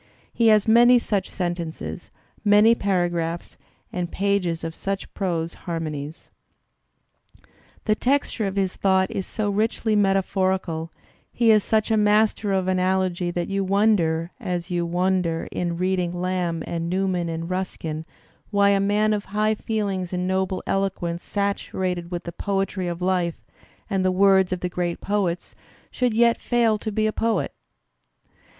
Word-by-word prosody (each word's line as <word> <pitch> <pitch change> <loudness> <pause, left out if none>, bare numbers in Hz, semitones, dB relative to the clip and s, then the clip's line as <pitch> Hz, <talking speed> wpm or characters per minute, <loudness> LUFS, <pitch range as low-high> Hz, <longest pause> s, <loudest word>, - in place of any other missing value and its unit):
He 230 - +3
has 215 -1 +5
many 240 +2 +7
such 205 -4 -1
sentences, 175 -3 -4 0.3
many 210 +2 +6
paragraphs 175 -5 -1 0.4
and 175 -1 -3
pages 195 -4 0
of 165 0 -4
such 195 +3 -4
prose 170 -4 -2 0.2
harmonies. 155 -2 -5 1.5
The 215 - +3
texture 250 -2 0
of 195 - -4
his 190 -2 0
thought 190 -1 +2
is 190 - -3
so 210 -2 -2
richly 220 +1 0
metaphorical, 190 -4 +1 0.4
he 235 -2 +4
is 215 -2 +5
such 220 0 +1
a 220 - +3
master 210 0 +3
of 190 -1 +1
analogy 185 -1 +1
that 175 0 -2
you 195 0 0
wonder, 185 -5 +2
as 180 -6 -3
you 175 -1 0
wonder 180 -1 0
in 170 -1 -2
reading 180 -1 -1
Lamb 180 -3 -1
and 170 0 -3
Newman 185 -2 0
and 165 0 -4
Ruskin, 170 -4 -4 0.5
why 200 -1 +4
a 200 0 +3
man 210 +2 +2
of 210 -1 -2
high 215 +2 +1
feelings 200 -5 -2
and 180 0 -1
noble 190 0 -1
eloquence, 180 -3 -1
saturated 185 -3 -2
with 175 -1 -4
the 170 - -6
poetry 195 0 -2
of 175 0 -4
life 180 -2 -1 0.4
and 195 -3 0
the 185 - +3
words 190 0 +4
of 185 - -2
the 180 - -1
great 175 -1 -2
poets, 195 -4 -1 0.4
should 250 -3 0
yet 235 0 +3
fail 230 -3 +2
to 220 - -4
be 215 +1 0
a 215 - 0
poet. 225 -4 0
190 Hz, 150 wpm, -24 LUFS, 175-205 Hz, 1.5 s, many